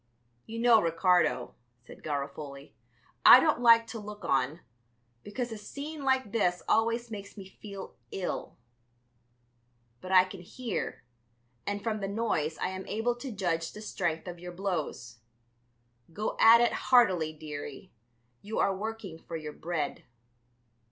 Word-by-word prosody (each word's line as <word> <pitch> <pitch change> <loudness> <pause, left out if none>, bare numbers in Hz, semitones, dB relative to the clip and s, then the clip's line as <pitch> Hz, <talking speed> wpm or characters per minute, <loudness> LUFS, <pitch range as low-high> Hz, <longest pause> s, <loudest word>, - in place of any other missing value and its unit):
"You 225 - -6
know, 230 -1 +5
Ricardo," 170 -5 +2 0.3
said - - -13
Garofoli, 140 -2 -5 0.5
"I - - +11
don't 300 -4 +2
like 230 -1 +7
to 230 - -7
look 210 0 -9
on, 135 +5 0 0.6
because 240 +3 -4
a 220 - -6
scene 290 +7 -7
like 265 -5 +1
this 180 -5 +1
always 230 +1 +1
makes 200 0 -8
me 195 - -8
feel 200 0 -10 0.2
ill. 190 -2 -4 1.4
But 185 - -7
I 185 -1 +8
can 185 0 -9
hear, 230 +4 -5 0.6
and 205 0 -2
from 220 -2 -1
the 195 - -3
noise 195 -8 -1
I - - -1
am 190 0 -6
able 225 +3 0
to 260 +1 -6
judge 170 -5 -2
the 210 - -9
strength 170 -5 -2
of 175 -1 -7
your 180 0 -8
blows. 155 - -4 0.9
Go 210 +6 -3
at 230 +1 +8
it 240 - +3
heartily, 185 -11 +3
dearie; 150 -2 -8 0.5
you 215 +2 -5
are 195 - +2
working 210 -4 -6
for 165 - -8
your 155 -1 -7
bread." 160 -3 -3
195 Hz, 145 wpm, -29 LUFS, 165-225 Hz, 1.4 s, I